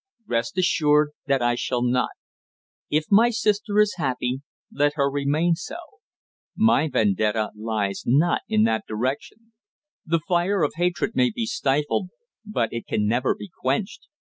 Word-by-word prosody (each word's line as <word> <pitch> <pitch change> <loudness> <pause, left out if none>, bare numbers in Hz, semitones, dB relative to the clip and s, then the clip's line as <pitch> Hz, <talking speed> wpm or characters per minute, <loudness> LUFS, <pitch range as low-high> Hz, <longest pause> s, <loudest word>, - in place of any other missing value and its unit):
Rest 115 +4 -2
assured 150 -4 +3 0.2
that 135 -3 +2
I 120 0 +3
shall 120 0 -1
not. 125 0 +1 0.8
If 155 +7 -1
my 225 +4 +6
sister 210 -2 0
is 210 -2 +3
happy, 130 -2 -1 0.3
let 145 +1 +1
her 140 -2 +2
remain 145 +5 +1
so. 250 - -6 0.8
My 190 -9 +3
vendetta 105 0 +1
lies 105 -2 -2
not 150 +8 +3
in 110 0 +3
that 110 0 +1
direction. 135 - -4 0.5
The 165 0 0
fire 175 +1 +1
of 145 - +1
hatred 175 -1 0
may 125 -1 +3
be 115 0 -3
stifled, 145 - 0 0.3
but 205 - -2
it 115 - -5
can 105 - 0
never 120 +4 +1
be 200 - -10
quenched. 140 +10 -2
140 Hz, 145 wpm, -24 LUFS, 120-175 Hz, 0.8 s, my